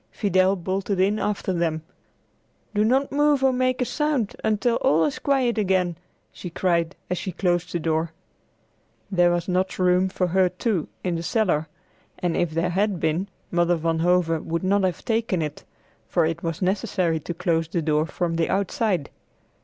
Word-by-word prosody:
Fidel 190 -1 +2
bolted 190 +1 -2
in 200 +3 +2
after 205 -2 -1
them. 165 -2 -1 0.9
"Do 210 0 +2
not 265 +5 +2
move 290 -1 +3
or 265 -1 +4
make 255 0 +1
a - - -2
sound 290 -6 -1
until 220 +2 +1
all 160 +2 +3
is 150 - -2
quiet 255 -5 +1
again," 185 -4 +1 0.4
she 180 - -8
cried 170 0 0 0.2
as 180 - 0
she 190 - -4
closed 175 -1 0
the 175 - -1
door. 160 0 0 1.0
There 175 -2 +4
was 175 0 -1
not 185 +1 0
room 185 0 +3
for 185 0 -1
her 185 +1 +3
too, 185 -1 -1 0.2
in 180 - 0
the - - -3
cellar, 170 -4 +1 0.5
and 175 -2 -1
if 175 - +1
there 165 +3 -1
had 195 0 0
been, 160 +5 0 0.2
Mother 175 0 +2
Van 165 0 -1
Hove 170 -2 +2
would 170 +2 -2
not 200 +2 +2
have 180 -2 -3
taken 225 -5 0
it, 150 -1 -6 0.4
for 170 -3 +2
it 165 +1 -2
was 165 +2 -3
necessary 185 -4 0
to 170 +3 -6
close 165 -2 0
the 165 0 -2
door 155 0 +1
from 170 -1 -2
the 165 - +1
outside. 195 - 0
180 Hz, 175 wpm, -24 LUFS, 165-205 Hz, 1.0 s, or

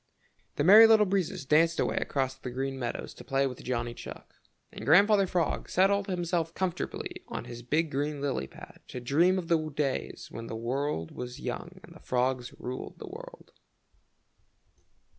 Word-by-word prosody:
The - - 0
Merry 215 +7 +10
Little 220 -1 +6
Breezes 185 -7 -1
danced 165 +4 +3
away - - 0
across 135 -2 -1
the 130 - -8
Green 135 +2 -3
Meadows 120 -2 -4
to - - -12
play 135 0 +1
with 125 -3 -5
Johnny 120 -1 -2
Chuck, - - -10 0.4
and - - -9
Grandfather 200 +5 +5
Frog 175 -2 -1
settled 200 +2 +3
himself 175 -3 -1
comfortably 185 -3 -3
on - - -5
his 120 0 -8
big 155 +6 0
green 145 +2 -2
lily 140 - -2
pad - - -13
to 125 - -6
dream 160 +9 +3
of 180 -3 -3
the 160 -2 +1
days 140 -2 -3
when 115 0 -7
the - - -5
world 120 - -2
was 125 +2 -7
young 180 +4 -6
and 170 - -13
the 160 - -14
frogs 125 -1 -1
ruled 125 +1 -6
the 445 - -8
world. - - -11
150 Hz, 170 wpm, -29 LUFS, 130-185 Hz, 0.4 s, Merry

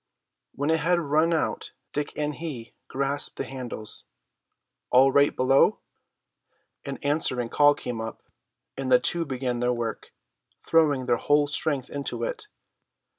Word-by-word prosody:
When 145 +3 0
it 160 - +2
had 175 +3 +2
run 155 +1 +2
out 160 - -2 0.2
Dick 150 0 -2
and 150 0 -1
he 140 -8 -7
grasped 140 +1 -1
the - - -3
handles. 125 -5 -5 0.8
"All 135 +2 +5
right 140 +1 +3
below?" 135 +1 +4 1.1
An 140 -1 -5
answering 140 -5 +1
call 145 +2 +5
came 120 -2 -5
up, 110 0 -7 0.5
and 135 -1 -4
the 125 - +7
two 170 -1 +1
began 125 -3 -3
their 125 0 +1
work, 120 -2 -5 0.5
throwing 150 -5 +3
their 120 -1 +2
whole 145 +3 +3
strength 145 -2 -1
into 140 -1 -4
it. 485 -4 -4
140 Hz, 140 wpm, -26 LUFS, 125-150 Hz, 1.1 s, the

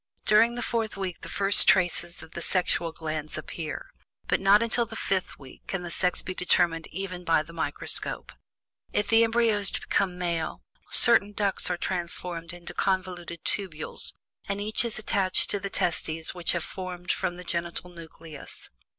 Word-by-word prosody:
During 230 +3 +5
the 240 - -3
fourth 225 -3 -1
week 185 -3 -4
the - - -8
first 200 0 +5
traces 175 -2 +2
of 160 - -13
the 170 - -6
sexual 170 -2 +1
glands 155 -1 -4
appear, 155 -1 -6 0.4
but - - +2
not 200 +3 +6
until 230 0 0
the - - -9
fifth 190 -2 -1
week 135 -2 -15
can 195 -2 -3
the 175 - -6
sex 180 +1 0
be 185 - -4
determined 175 -2 +1
even 185 0 -5
by 165 -2 +3
the 170 +2 -13
microscope. 165 - -1 0.6
If 205 - 0
the 225 0 +6
embryo 230 -1 +3
is 200 -1 +4
to - - -3
become 190 -2 +1
a - - -12
male, 170 -3 -2 0.3
certain 215 -4 +6
ducts 200 -3 0
are 180 - 0
transformed 175 -1 -4
into 175 0 -9
convoluted 180 -3 -2
tubules, 175 -7 -2 0.4
and 200 0 -1
each 215 +3 0
is 235 -2 -3
attached 200 -3 0
to 205 - 0
the 200 0 -4
testes 160 -3 -2
which 175 -2 0
have 170 -2 -1
been - - -10
formed 185 -1 -4
from 175 - -2
the 180 - -8
genital 170 0 -3
nucleus. 165 -3 -10
180 Hz, 180 wpm, -27 LUFS, 170-200 Hz, 0.6 s, not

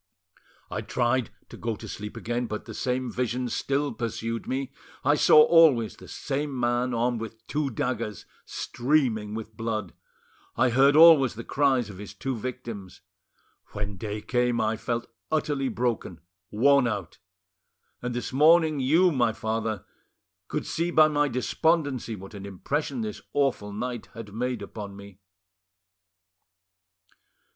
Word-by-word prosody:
I - - -2
tried 125 0 0 0.2
to - - -10
go 115 -2 -2
to - - -10
sleep 105 +1 -7
again, 120 +1 -2
but 105 -1 -5
the - - -8
same 130 0 -2
visions 125 0 -2
still 140 +1 -1
pursued 115 0 -4
me. 135 +1 -2 0.3
I 145 - +5
saw 150 0 +7
always 150 -11 +5
the - - -14
same 140 -1 -3
man 120 +1 +1
armed 120 0 0
with 115 0 -8
two 150 -1 -1
daggers 115 -3 -3 0.2
streaming 120 -6 0
with 110 0 -7
blood; 110 -5 -3 0.6
I 125 -1 +3
heard 135 +4 +5
always 155 -7 +7
the 115 - -6
cries 130 -6 +1
of 95 - -12
his 105 0 -9
two 130 +6 -3
victims. 115 -5 -7 0.7
When 105 -1 -4
day 105 +2 -4
came, 120 +1 +1
I 110 0 +1
felt 120 +1 -3 0.3
utterly 145 -3 0
broken, 115 -8 -2 0.3
worn 135 +4 +4
out; 100 -7 -4 0.8
and 125 0 -3
this 125 - -4
morning, 155 +1 +5
you, 165 +8 +4
my 120 -6 +2
father, 110 -1 -3 0.6
could - - -3
see 170 +1 -1
by 155 -2 +6
my 145 -1 +2
despondency 135 -1 0
what 95 +1 -11
an 100 -1 -7
impression 145 - -3
this 215 -1 -5
awful 135 -7 0
night 120 +3 -4
had 110 -3 -9
made 125 +2 -2
upon 100 -2 -8
me." 100 -1 -12
120 Hz, 145 wpm, -26 LUFS, 110-140 Hz, 0.8 s, saw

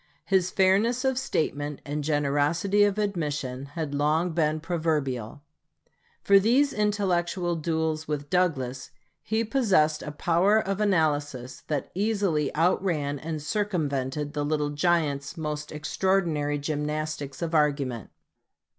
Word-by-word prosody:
His 190 -2 +2
fairness 210 +8 +2
of 265 -1 +1
statement 150 - -2
and 145 +1 -3
generosity 150 +7 +2
of 205 0 0
admission 145 -10 -2
had 155 -3 -2
long 155 +5 +1
been 155 -1 +1
proverbial. 150 - -2 0.8
For 200 0 +6
these 255 +8 +3
intellectual 185 -4 0
duels 160 -1 -1
with 145 -1 -3
Douglas, 135 -8 0 0.3
he 220 +1 0
possessed 195 - +2
a 150 - -5
power 175 +7 +2
of 195 -1 -2
analysis 145 -9 0
that 145 -4 -2
easily 195 -7 0
outran 160 -4 +1
and 155 0 -5
circumvented 150 - -2
the 145 -2 -1
"Little 150 0 0
Giant's" 150 -1 0
most 150 -1 -4
extraordinary 155 -2 0
gymnastics 150 -1 -3
of 165 0 -3
argument. 140 -6 +1
155 Hz, 120 wpm, -26 LUFS, 145-190 Hz, 0.8 s, For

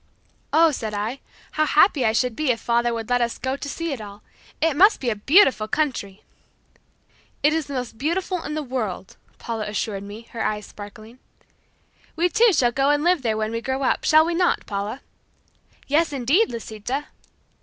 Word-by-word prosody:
"Oh," 325 0 +5
said 220 -6 -4
I, 220 +6 -3 0.3
"how 310 - +1
happy 300 -3 +4
I 220 - +4
should 245 +1 0
be 305 0 -1
if 235 -2 +1
father 235 +1 +1
would 225 -1 -4
let 245 0 +1
us 235 -1 -1
go 260 +1 -2
to 285 +1 -6
see 330 +1 -3
it 250 - -6
all. 205 0 -11 0.4
It 320 -3 +1
must 400 +7 +5
be 245 -3 -1
a - - -1
beautiful 265 - +4
country!" 225 -8 -2 1.2
"It 300 +1 +4
is 320 -2 -1
the 280 - -6
most 245 -3 -5
beautiful 355 +5 -1
in 300 - -4
the 310 - -2
world," 220 -8 -4 0.2
Paula 220 -2 -4
assured 210 -1 -3
me, 205 +3 -9
her 230 - -3
eyes 210 -1 -2
sparkling. 215 +4 -12 1.0
"We 345 +2 +2
too 455 +4 +4
shall 255 -8 +2
go 270 +3 +1
and 290 0 +2
live 350 -2 +3
there 225 -3 -1
when 215 0 -2
we 230 0 -3
grow 265 +2 -2
up; 255 - +1
shall 310 +1 +5
we 340 - -1
not, 350 +1 +1
Paula?" 205 +6 -4 0.8
"Yes, 305 +2 +2
indeed, 285 - +2
Lisita." 235 +5 -5
255 Hz, 190 wpm, -23 LUFS, 220-310 Hz, 1.2 s, Oh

